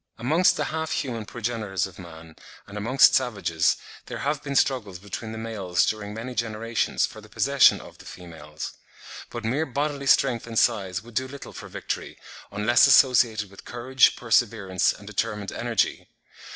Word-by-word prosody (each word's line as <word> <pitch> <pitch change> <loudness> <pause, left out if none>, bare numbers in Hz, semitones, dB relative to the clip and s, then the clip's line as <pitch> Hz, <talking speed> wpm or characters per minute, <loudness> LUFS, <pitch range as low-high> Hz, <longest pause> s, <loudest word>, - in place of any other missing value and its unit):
Amongst 155 +10 +3
the - - 0
half 160 0 -2
human 115 -6 -3
progenitors 110 -5 -2
of 95 - -11
man, 80 -2 -12 0.3
and 100 - -12
amongst 120 +6 +5
savages, 100 -10 +1 0.3
there - - -5
have 145 0 -2
been 140 -1 -5
struggles 115 -9 +1
between 105 +4 -7
the 110 - -6
males 105 -6 0
during 105 -1 -3
many 115 +4 -6
generations 115 -1 -1
for 110 - -10
the 105 - -16
possession 140 +5 +4
of - - -14
the - - -14
females. 80 -4 -9 0.6
But 120 -1 -6
mere 140 +8 0
bodily 140 +1 -2
strength 125 -4 +3
and 115 -1 -5
size 95 -6 +1
would 120 0 -14
do 130 +4 -1
little 140 +1 -10
for - - -9
victory, - - -5 0.3
unless 105 +4 +4
associated 110 -6 +4
with 100 - -13
courage, 125 +1 +2
perseverance, 110 -6 +1
and 100 - -12
determined 105 -1 -3
energy. 120 -1 -1
115 Hz, 165 wpm, -25 LUFS, 100-125 Hz, 0.6 s, amongst